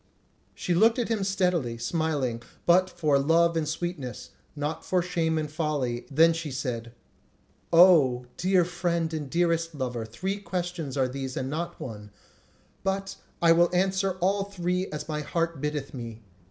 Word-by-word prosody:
She 180 Hz, -, -1 dB
looked 225 Hz, +7 st, +4 dB
on 245 Hz, -, +1 dB
him 220 Hz, -3 st, -1 dB
steadily, 180 Hz, -11 st, 0 dB
smiling, 135 Hz, -2 st, -1 dB, 0.2 s
but 185 Hz, +2 st, +5 dB
for 155 Hz, -6 st, +2 dB
love 165 Hz, +4 st, +3 dB
and 155 Hz, -2 st, 0 dB
sweetness, 155 Hz, -, -5 dB, 0.2 s
not 150 Hz, +1 st, -3 dB
for 180 Hz, -2 st, +1 dB
shame 165 Hz, -2 st, 0 dB
and 155 Hz, -1 st, -1 dB
folly; 145 Hz, -6 st, -2 dB
then 165 Hz, +4 st, +5 dB
she 165 Hz, -2 st, -4 dB
said: 120 Hz, -3 st, -4 dB, 0.8 s
"O, 155 Hz, -8 st, +6 dB
dear 185 Hz, -1 st, +3 dB
friend 170 Hz, -2 st, -1 dB
and 150 Hz, -3 st, -4 dB
dearest 165 Hz, 0 st, +1 dB
lover, 125 Hz, -4 st, -3 dB
three 190 Hz, -, -3 dB
questions 175 Hz, -7 st, -4 dB
are 130 Hz, -1 st, +3 dB
these 130 Hz, 0 st, -5 dB
and 130 Hz, +1 st, -2 dB
not 170 Hz, +3 st, -4 dB
one; 105 Hz, -4 st, -7 dB, 0.7 s
but 195 Hz, 0 st, -2 dB, 0.3 s
I 165 Hz, -, +7 dB
will 170 Hz, +1 st, +5 dB
answer 190 Hz, +1 st, +1 dB
all 195 Hz, +2 st, +2 dB
three 180 Hz, -1 st, -2 dB
as 150 Hz, 0 st, -6 dB
my 150 Hz, -1 st, -2 dB
heart 165 Hz, 0 st, -2 dB
biddeth 150 Hz, -2 st, -3 dB
me. 115 Hz, -3 st, -7 dB
165 Hz, 155 wpm, -27 LUFS, 135-180 Hz, 0.8 s, I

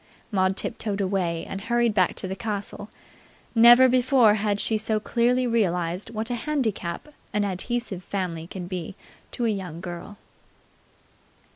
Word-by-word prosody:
Maud 190 Hz, -1 st, +1 dB
tiptoed 210 Hz, -3 st, -3 dB
away, 185 Hz, -4 st, -1 dB
and 195 Hz, -, -5 dB
hurried 235 Hz, +1 st, +1 dB
back 185 Hz, -3 st, +2 dB
to -, -, -4 dB
the 190 Hz, -, -4 dB
castle. 205 Hz, -1 st, -3 dB, 0.6 s
Never 240 Hz, +2 st, +8 dB
before 250 Hz, -3 st, +4 dB
had 205 Hz, -1 st, 0 dB
she 220 Hz, -, +1 dB
so 215 Hz, 0 st, 0 dB
clearly 245 Hz, +3 st, +1 dB
realized 180 Hz, -5 st, 0 dB
what 225 Hz, +2 st, -4 dB
a -, -, 0 dB
handicap 240 Hz, -, -2 dB, 0.2 s
an 205 Hz, 0 st, +1 dB
adhesive 200 Hz, 0 st, -3 dB
family 170 Hz, -4 st, -4 dB
can 180 Hz, 0 st, -7 dB
be 180 Hz, -1 st, -5 dB, 0.3 s
to 240 Hz, -, -3 dB
a -, -, +2 dB
young 185 Hz, -6 st, -4 dB
girl. 175 Hz, +3 st, -8 dB
205 Hz, 145 wpm, -25 LUFS, 185-235 Hz, 0.6 s, Never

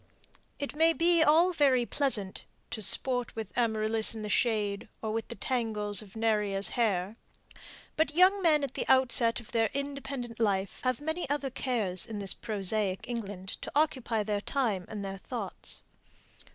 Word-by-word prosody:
It 285 Hz, 0 st, -5 dB
may 325 Hz, +2 st, +4 dB
be 335 Hz, 0 st, +3 dB
all 325 Hz, +4 st, +5 dB
very 270 Hz, -6 st, +3 dB
pleasant 230 Hz, -9 st, +2 dB, 0.3 s
"to 220 Hz, -, -4 dB
sport 245 Hz, +4 st, +3 dB
with 220 Hz, -5 st, -6 dB
Amaryllis 220 Hz, -1 st, +1 dB
in 220 Hz, -, -6 dB
the 210 Hz, -, -4 dB
shade, 210 Hz, -3 st, 0 dB
or 220 Hz, -, -3 dB
with 225 Hz, 0 st, -3 dB
the -, -, -7 dB
tangles 210 Hz, -4 st, -1 dB
of 210 Hz, -1 st, -14 dB
Neżra's 210 Hz, -3 st, +1 dB
hair," 210 Hz, -3 st, -1 dB, 0.8 s
but 310 Hz, -1 st, 0 dB
young 375 Hz, +3 st, +5 dB
men 310 Hz, -5 st, +3 dB
at 270 Hz, -2 st, -3 dB
the -, -, -4 dB
outset 250 Hz, -2 st, +4 dB
of 235 Hz, -, -12 dB
their 225 Hz, -1 st, +2 dB
independent 275 Hz, -4 st, -5 dB
life 195 Hz, -3 st, 0 dB
have 255 Hz, +1 st, 0 dB
many 315 Hz, 0 st, -3 dB
other 285 Hz, -2 st, -1 dB
cares 215 Hz, -9 st, -1 dB
in 220 Hz, -, -6 dB
this 195 Hz, -2 st, 0 dB
prosaic 200 Hz, -2 st, -1 dB
England 205 Hz, -6 st, -5 dB
to -, -, -6 dB
occupy 260 Hz, -7 st, +1 dB
their 205 Hz, -1 st, -2 dB
time 215 Hz, -8 st, -1 dB
and 210 Hz, -2 st, -5 dB
their 195 Hz, 0 st, -6 dB
thoughts. -, -, -6 dB
230 Hz, 165 wpm, -29 LUFS, 205-275 Hz, 0.8 s, all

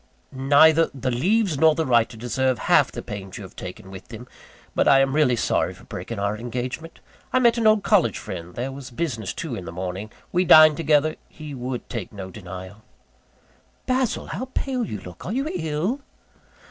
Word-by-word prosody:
"Neither 145 Hz, +5 st, +5 dB
the 130 Hz, -1 st, -2 dB
leaves 180 Hz, -, +1 dB
nor 160 Hz, 0 st, +5 dB
the 160 Hz, -, 0 dB
writer 115 Hz, -2 st, +2 dB
deserve 130 Hz, +2 st, 0 dB
half -, -, +3 dB
the -, -, -7 dB
pains 95 Hz, -2 st, -7 dB
you 105 Hz, -, -8 dB
have 95 Hz, -, -12 dB
taken 95 Hz, +2 st, -9 dB
with 95 Hz, -1 st, -10 dB
them; 120 Hz, +2 st, -10 dB, 0.5 s
but -, -, +2 dB
I 135 Hz, -, +7 dB
am 135 Hz, 0 st, +2 dB
really 145 Hz, -5 st, +3 dB
sorry -, -, 0 dB
for -, -, -17 dB
breaking 115 Hz, -, -7 dB
our 100 Hz, +1 st, -1 dB
engagement. 125 Hz, +7 st, -5 dB, 0.3 s
I -, -, +2 dB
met 240 Hz, -2 st, +4 dB
an 225 Hz, -, +3 dB
old 215 Hz, -2 st, +4 dB
college 205 Hz, -4 st, +3 dB
friend 90 Hz, -1 st, -7 dB
there 130 Hz, +3 st, -3 dB
was 135 Hz, -1 st, -9 dB
business 120 Hz, -, -3 dB
too, 160 Hz, -6 st, -5 dB
in 95 Hz, -6 st, -5 dB
the 85 Hz, -, -6 dB
morning 95 Hz, +4 st, -5 dB, 0.2 s
we 180 Hz, -, +2 dB
dined 155 Hz, -3 st, +8 dB
together 155 Hz, -1 st, +2 dB
he 150 Hz, -2 st, -9 dB
would 125 Hz, -1 st, -5 dB
take 115 Hz, -6 st, -5 dB
no 95 Hz, -2 st, -8 dB
denial." 95 Hz, +1 st, -9 dB, 1.0 s
"Basil, 255 Hz, -2 st, 0 dB
how 255 Hz, -, -4 dB
pale 260 Hz, -3 st, -1 dB
you 105 Hz, -, -5 dB
look! 90 Hz, -2 st, -11 dB
Are 185 Hz, -, -4 dB
you 270 Hz, +4 st, -1 dB
ill?" 165 Hz, -, -2 dB
130 Hz, 190 wpm, -23 LUFS, 105-160 Hz, 1.0 s, dined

